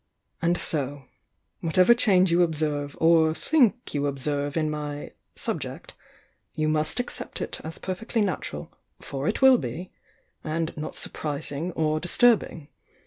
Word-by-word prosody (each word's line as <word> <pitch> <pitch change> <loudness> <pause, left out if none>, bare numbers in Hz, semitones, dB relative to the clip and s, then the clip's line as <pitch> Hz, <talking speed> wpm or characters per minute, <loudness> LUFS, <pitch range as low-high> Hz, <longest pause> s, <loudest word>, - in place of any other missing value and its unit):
And 170 +1 +2
so, 140 -4 -3 0.3
— - - -49
whatever 185 +7 +5
change 190 -6 +3
you 170 +1 +4
observe 150 -3 -1
or 160 -1 +4
think 250 - +2
you 145 -1 0
observe 145 +2 -2
in 155 -1 +1
my 150 -1 -4 0.2
'subject,' - - -3 0.6
you 155 0 0
must 155 +6 +1
accept 245 - -4
it - - -4
as 160 +1 -5
perfectly 220 +5 -2
nat 200 -3 -1
ural - - -8 0.3
(for 140 +2 -4
it - - 0
will 260 -2 +8
be) 180 +3 -6 0.5
and 160 +1 -2
not 150 0 -5
surprising 150 +2 -3
or 155 -1 +1
disturb 225 +7 +4
ing. 150 -4 -9
160 Hz, 145 wpm, -26 LUFS, 150-185 Hz, 0.6 s, will